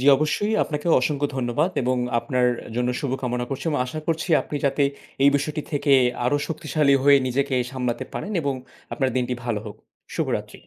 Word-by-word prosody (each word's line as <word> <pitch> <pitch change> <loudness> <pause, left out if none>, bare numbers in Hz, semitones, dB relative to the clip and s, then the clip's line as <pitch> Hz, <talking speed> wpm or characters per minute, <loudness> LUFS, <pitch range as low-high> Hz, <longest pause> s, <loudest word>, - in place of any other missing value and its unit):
জ্বি, 130 - -1
অবশ্যই 180 +9 0
আপনাকে 150 +1 -4
অসংখ্য 145 +2 0
ধন্যবাদ 130 +7 0
এবং 130 +1 +1 0.2
আপনার 125 +2 +1 0.3
জন্য 125 0 +1
শুভকামনা 125 -3 -2
করছি 135 0 -4
এবং 150 - 0
আশা 155 +5 -5
করছি 165 +1 -1
আপনি 150 - -5
যাতে 140 +1 +2 0.4
এই 140 - +7
বিষয়টি 150 +2 -2
থেকে 145 0 +2 0.3
আরও 135 +4 +2
শক্তিশালী 155 -3 +1
হয়ে 140 0 +8
নিজেকে 135 +2 0 0.2
সামলাতে 125 -2 -2
পারেন 210 - -4
এবং 140 -1 0 0.4
আপনার 135 -2 0
দিনটি 125 0 0
ভালো 115 -3 -1
হোক। 105 - -8 0.4
শুভ - - 0
রাত্রি। - - -13
140 Hz, 175 wpm, -24 LUFS, 125-150 Hz, 0.4 s, হয়ে